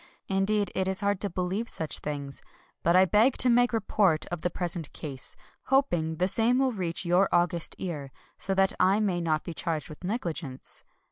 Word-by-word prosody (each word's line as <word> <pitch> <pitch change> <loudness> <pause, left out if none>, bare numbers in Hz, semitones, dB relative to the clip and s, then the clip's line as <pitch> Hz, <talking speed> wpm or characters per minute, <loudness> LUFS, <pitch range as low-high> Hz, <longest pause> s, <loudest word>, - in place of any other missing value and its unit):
Indeed, 200 +2 +1
it 190 0 0
is 190 0 +1
hard 200 -1 0
to 205 - +1
believe 185 +6 -2
such 160 -2 +1
things. 140 -2 -4 0.4
But 170 +1 +2
I 185 +1 +7
beg 220 +7 +3
to 250 - +4
make 245 +1 +4
report 200 -7 +1
of 175 -2 -4
the 175 - 0
present 175 -3 -3
case, 140 -4 -5 0.3
hoping 175 - +1
the 180 +3 +1
same 230 +5 +2
will 265 -1 +2
reach 180 -3 -3
your 180 +3 +3
august 175 -1 +2
ear, 150 -7 -5
— - - -33
so 195 - +4
that 195 0 +3
I 195 +3 +4
may 190 -5 0
not 155 -2 0
be 170 - -6
charged 160 -1 -3
with 155 +3 -12
negligence. 170 - -3
180 Hz, 195 wpm, -28 LUFS, 165-205 Hz, 0.4 s, I